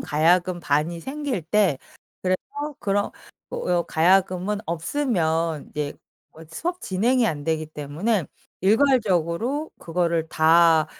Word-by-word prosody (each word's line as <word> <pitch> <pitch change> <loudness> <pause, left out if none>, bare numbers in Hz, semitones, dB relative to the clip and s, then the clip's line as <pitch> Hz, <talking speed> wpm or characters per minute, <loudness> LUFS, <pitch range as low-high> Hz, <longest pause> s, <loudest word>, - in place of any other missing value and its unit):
가야금 175 +3 +2
반이 155 +3 0
생길 270 - -3
때. 180 -5 +2 0.4
그래서 185 0 +1 0.4
그런 200 0 0 0.4
어 175 -1 0
가야금은 185 +4 +2
없으면 165 - -1
이제 150 -1 -3 0.4
어 160 - -15
수업 350 - -3
진행이 230 +6 +1
안 145 -5 -3
되기 160 -1 0
때문에 155 +7 -2 0.4
일괄적으로 225 - +2
그거를 170 -1 -1
다 160 0 +5
175 Hz, 240 characters per minute, -24 LUFS, 160-210 Hz, 0.4 s, 다